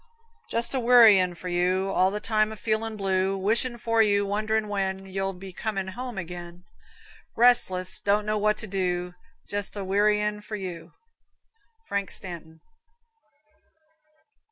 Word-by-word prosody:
Jest 235 +3 +2
a 265 - 0
wearyin' 225 -7 +6
for 180 - -8
you, 180 +2 0
All 185 0 +3
the 210 +2 -3
time 215 0 +1
a - - -6
feelin' 220 0 -2
blue; 190 0 0
Wishin' 230 +5 0
for 230 -1 +1
you, 205 -2 +3
wonderin' 215 +2 -1
when 195 -1 -2
You'll 195 0 -3
be 190 0 -10
comin' 195 -1 -3
home 245 +2 -6
again; 175 0 -7 0.7
Restless 220 -7 +2
don't 205 +1 +1
know 215 0 0
what 210 0 +2
to - - -6
do 180 -3 -2 0.3
Jest 205 0 -4
a 200 - -4
wearyin' 210 +2 +1
for 215 +1 -6
you. 175 -4 -7 0.9
Frank 200 -1 -2
Stanton. 165 -3 -9
200 Hz, 140 wpm, -26 LUFS, 185-215 Hz, 0.9 s, wearyin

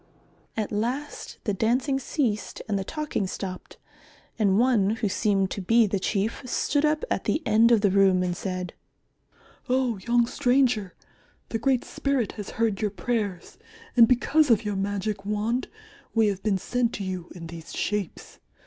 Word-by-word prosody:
At 215 -2 -2
last 245 +8 -3
the 205 - 0
dancing 250 +7 +1
ceased 245 -6 -2
and 200 -2 0
the - - -2
talking 300 -5 -3
stopped, 185 -1 -6 0.6
and 200 -3 +3
one 225 -4 +3
who 225 - -1
seemed 195 -1 +1
to 200 - -3
be 230 +5 +4
the 200 -1 -1
Chief 205 +3 -1
stood 285 +3 0
up 305 0 +2
at - - -1
the 315 - 0
end 220 +2 +5
of 230 -3 +5
the 200 -2 +3
room 190 -2 +4
and 175 -1 -1
said, 185 -1 -4 1.0
"Oh, 250 -4 +1
young 240 +3 +2
stranger, 245 -7 +1 0.5
the 225 - -2
Great 255 +1 +1
Spirit 275 -6 -1
has 205 -2 -7
heard 225 -3 +1
your 210 - +1
prayers, 205 -3 -3 0.4
and 235 -2 +8
because 280 +5 +3
of 225 -2 +3
your 205 -1 -1
magic 200 +1 -2
wand 210 +5 -1 0.5
we 220 -2 +4
have 195 -1 -3
been 205 -2 +1
sent 245 +4 -1
to 205 - -4
you 185 -2 -5
in 170 -2 -8
these 165 0 -9
shapes. 210 -4 -3
215 Hz, 165 wpm, -26 LUFS, 195-245 Hz, 1.0 s, and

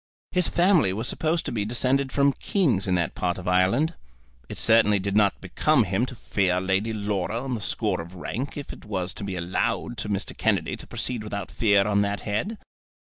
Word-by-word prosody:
His 180 -2 +3
family 175 - +3
was 110 +5 -2
supposed 160 +1 0
to - - -2
be 110 -3 -1
descended 130 +4 +1
from 140 +1 +3
kings 140 - 0
in 90 - +2
that 85 -2 0
part 90 -1 -1
of 95 -1 -7
Ireland. 95 - +3 0.6
It - - -6
certainly 110 -2 +4
did 100 +1 -2
not 105 -2 +3
become - - +2
him - - 0
to - - -8
fear 90 -2 0
Lady 95 +4 0
Laura 105 +2 -2
on 135 -1 -3
the 115 - -3
score 105 -4 -1
of 85 +3 -11
rank, 125 - -4
if 145 - -6
it - - -13
was 95 -4 -3
to - - -6
be 100 -2 -3
allowed 90 +6 -2
to 105 - -3
Mr. 100 -1 -2
Kennedy - - 0
to - - -11
proceed 120 -4 -3
without 100 -3 -5
fear 100 -3 +3
on 100 -1 +2
that 100 0 -1
head. 110 - -2
105 Hz, 205 wpm, -25 LUFS, 95-125 Hz, 0.6 s, certainly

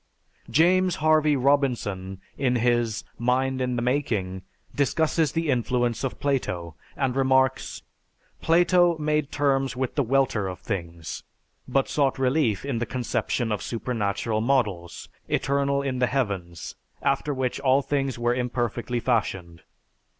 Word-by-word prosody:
James 180 +3 +3
Harvey 155 -1 +3
Robinson, 120 -9 0 0.2
in 130 -2 +1
his 120 -2 +1 0.2
"Mind 130 +2 +1
in 125 -1 0
The 120 - -1
Making," 110 -8 -1 0.3
discusses 160 +2 +1
the 165 -2 0
influence 120 -1 0
of 135 - -3
Plato, 90 - -1 0.2
and 130 -2 0
remarks, 130 -1 +1 0.6
"Plato 175 0 +4
made 150 -1 0
terms 135 -2 +1
with 130 0 -2
the 145 - +1
welter 130 -5 +1
of 90 -1 -5
things, 85 -5 -5 0.5
but 135 +1 +1
sought 140 -3 +1
relief 130 -5 +1
in 135 -5 -2
the 120 - -2
conception 120 0 -1
of 105 - -1
supernal 110 -2 -2
models, 105 -9 -1 0.2
eternal 140 0 +1
in 130 -2 -2
the 125 - +3
heavens, 100 - -3 0.3
after 150 - +1
which 130 -2 -2
all 135 +1 +3
things 135 -3 -1
were 120 0 +1
imperfectly 120 -1 -2
fashioned. 95 -9 -1
125 Hz, 130 wpm, -25 LUFS, 115-140 Hz, 0.6 s, Plato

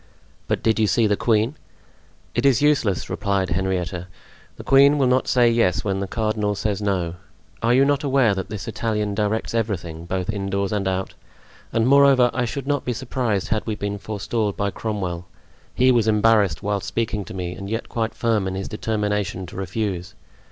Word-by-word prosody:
"But - - -1
did 110 0 +2
you 110 - +3
see 115 +2 +3
the 105 -1 +2
queen?" 110 +4 +1 0.8
"It - - 0
is 135 -4 +4
useless," 140 -11 +2
replied 100 -3 -1
Henrietta, 90 -1 -2 0.5
"the - - -10
queen 140 +2 +5
will 135 - +3
not 130 +1 +2
say 125 -1 +4
yes 115 -5 +2
when 95 -2 -1
the 100 - -3
cardinal 110 -1 -1
says 105 0 -2
no. 90 -4 -1 0.4
Are 120 +1 +3
you 135 +1 +5
not 145 0 +1
aware 135 -6 +3
that 95 -1 -4
this 105 -2 -6
Italian 105 -2 -1
directs 105 +2 -1
everything, 90 -8 -3
both 95 +2 -2
indoors 100 -1 -2
and 100 -2 -1
out? 95 0 -2 0.6
And 115 0 +1
moreover, 135 -3 +6
I 125 0 0
should 135 +3 -4
not 145 0 0
be 125 - -1
surprised 120 -5 -2
had 110 -1 0
we 110 - -1
been 100 -1 -4
forestalled 105 0 -2
by 100 -1 0
Cromwell. 90 -5 -4 0.5
He 130 +1 +4
was 115 -3 +2
embarrassed 105 -5 +3
whilst 100 -1 -2
speaking 105 -1 -2
to - - -9
me 90 -1 -4
and 100 +1 -7
yet 115 +1 -3
quite 110 -1 -2
firm 110 -5 +1
in 95 - -3
his 95 0 -4
determination 105 -3 -2
to 85 - -11
refuse. 95 -1 -3
105 Hz, 185 wpm, -22 LUFS, 95-115 Hz, 0.8 s, moreover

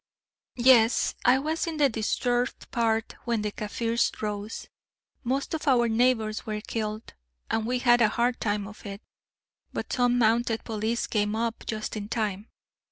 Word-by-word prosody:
"Yes, 240 -2 +5
I 250 +2 +6
was 310 +5 -2
in 320 -2 -3
the 290 -2 +5
disturbed 245 +1 -1
part 225 -2 0
when 230 -3 0
the 210 - -2
Kaffirs 230 +3 -1
rose. 210 0 -4 0.6
Most 265 +5 -1
of 315 -1 -4
our 245 -3 +4
neighbours 225 -2 +1
were 215 -2 -3
killed, 215 0 -4 0.4
and 225 0 0
we 250 +1 +1
had 240 -1 +4
a 220 - +5
hard 240 +2 0
time 205 -2 -1
of 215 - -12
it, 200 0 -8 0.7
but - - -4
some 245 -1 +2
mounted 230 0 +2
police 220 +1 -1
came 210 -1 0
up 230 0 -2
just 215 0 -3
in 205 -1 -5
time. 210 -2 -2
230 Hz, 160 wpm, -27 LUFS, 215-245 Hz, 0.7 s, I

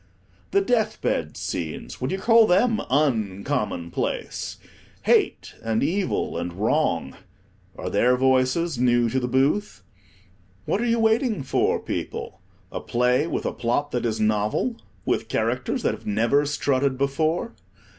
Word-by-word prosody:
The 395 - +3
death 225 - +1
bed 75 -2 -1
scenes, 80 -3 -5
would 130 - -1
you 190 - -1
call 225 +2 +5
them 220 +4 +3
_un_commonplace? 110 - -1 0.5
Hate, - - +2
and 115 -1 0
Evil, 175 - -1
and 85 0 -4
Wrong—are 95 - -3
their 125 +1 +3
voices 130 +4 +2
new 120 -2 +3
to 130 - +1
the 125 - -2
booth? 140 +11 0 0.8
What 205 - 0
are 240 - 0
you 230 0 +2
waiting 225 - +2
for, - - +1
people? - - -5 0.3
a - - -4
play 125 +5 +1
with - - -3
a - - -1
plot 135 +5 -1
that 120 -1 0
is 110 -1 -2
novel, 110 - +1 0.3
with - - 0
characters - - -1
that - - +2
have - - -10
never 115 +8 +2
strutted 140 -2 0
before? 155 +4 0
130 Hz, 135 wpm, -24 LUFS, 115-175 Hz, 0.8 s, call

